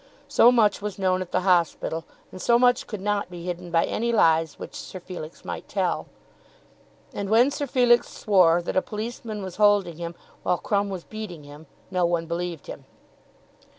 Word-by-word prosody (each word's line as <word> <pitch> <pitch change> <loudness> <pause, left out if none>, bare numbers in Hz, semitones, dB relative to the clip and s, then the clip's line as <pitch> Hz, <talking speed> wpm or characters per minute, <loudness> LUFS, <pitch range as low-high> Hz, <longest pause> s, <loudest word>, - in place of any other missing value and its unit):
So 240 - +6
much 215 -5 +3
was 205 -2 -4
known 185 -1 +1
at 185 - -6
the 185 - +1
hospital, 170 -3 +1 0.3
and 185 - -9
so 235 - +4
much 245 0 +3
could 210 -4 -6
not 205 -1 -1
be 175 -1 -9
hidden 180 0 -5
by 165 -1 +3
any 235 +2 -1
lies 165 -7 +3
which - - -8
Sir 185 - -8
Felix 175 -3 -9
might - - -6
tell. - - -1 1.1
And 200 -1 -4
when 240 +6 +5
Sir 285 0 -3
Felix 245 -2 +3
swore 175 -4 +3
that - - -4
a 185 - +4
policeman 220 -2 -6
was 185 -2 -7
holding 205 -5 +3
him 170 0 -5 0.3
while 180 - +1
Crumb 200 +1 0
was 185 -3 -5
beating 210 -8 -8
him, 145 +2 -13 0.2
no 180 -1 +1
one 170 -1 0
believed 170 -1 -4
him. - - -9
185 Hz, 185 wpm, -25 LUFS, 170-215 Hz, 1.1 s, So